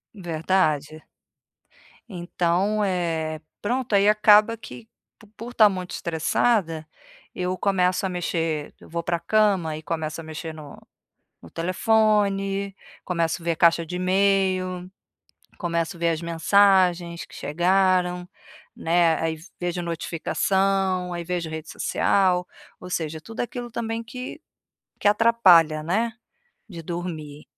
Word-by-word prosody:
Verdade. 160 -4 -1 1.1
Então, 180 +3 0
eh, 165 -4 -2 0.2
pronto, 245 +2 -2
aí 200 +1 +4
acaba 210 +1 +5
que 225 0 -11 0.3
po 220 - -18
por 235 +2 -8
estar 220 -4 +6
muito 185 -2 -5
estressada, 165 0 0 0.5
eu 180 0 -2
começo 185 0 +1
a - - -1
mexer 165 -4 -2
eu - - -15
vou 170 +1 -3
pra 170 -1 -1
cama 195 -6 +1
e 155 - -7
começo 160 0 -4
a - - -11
mexer 160 +1 -7
no 150 -2 -11 0.7
no 85 - -13
telefone, 195 +1 +1 0.3
começo 170 -1 -1
ver 170 - +1
a 160 - -4
caixa 170 0 +4
de 180 - -5
e-mail, 185 -1 +1 0.7
começo 170 -1 -2
ver 170 0 +1
as 160 -1 -1
mensagens 175 0 +3
que - - -16
chegaram, 180 +2 +1 0.5
né, 170 0 +2
aí 160 0 -1 0.2
vejo 175 0 -2
notificação, 185 +2 0
aí 175 0 -4
vejo 175 -1 -3
rede 160 -1 -7
social, 185 -2 +1 0.4
ou - - -9
seja, 160 -2 -3
tudo 225 +7 -8
aquilo 240 0 -4
também 225 0 -3
que 250 +3 -8 0.6
que - - +1
atrapalha, 195 -8 +5
né, 210 +9 0 0.6
de 170 -4 -8
dormir. 155 -4 -6
180 Hz, 125 wpm, -24 LUFS, 165-200 Hz, 1.1 s, estar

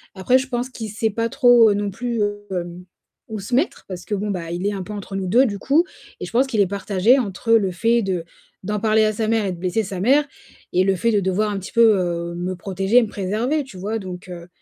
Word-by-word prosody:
Après, 220 +7 +3
je 265 - -5
pense 245 0 -2
qu'il 225 -4 -7
sait 220 +2 -1
pas 230 +2 -1
trop, 240 -4 +5
non 205 0 -2
plus, 230 +1 -3 0.3
hem, 175 -1 -5 0.4
où 220 -1 -5
se 215 +5 -3
mettre, 290 +7 0
parce 180 -2 -7
que 205 - -2
bon, 210 +2 -3
bah, 170 -3 -4
il 175 +3 -3
est 205 - 0
un 195 -2 -4
peu 210 +3 -8
entre 200 -1 -7
nous 190 -1 -3
2, 245 +8 +5
du 200 -3 -4
coup, 290 - +3 0.4
et - - -3
je - - -9
pense 255 +4 +2
qu'il 225 -6 +1
est 195 - +3
partagé 200 +5 +2
entre 225 0 -3
le 200 -5 +3
fait 230 +6 +2
de 185 -3 -2 0.4
d'en 210 +2 -2
parler 220 0 +3
à 215 - +1
sa 215 +1 -2
mère 225 -2 +1
et 190 - -1
de - - -9
blesser 185 +5 0
sa 190 -2 -6
mère 280 +8 +3 0.5
et 185 - +3
le 195 0 +2
fait 230 +6 +1
de 210 - +3
devoir 195 +3 0
un 200 - -3
petit 185 - -9
peu, 235 - +3 0.2
heu, 170 -1 -2
me 180 +2 -3
protéger, 195 +6 +2
me - - -3
préserver, 220 +11 -1
tu 235 -9 -13
vois? 215 +4 -3
Donc 185 -1 -8
heu, 175 -1 -8
205 Hz, 260 wpm, -21 LUFS, 185-230 Hz, 0.5 s, trop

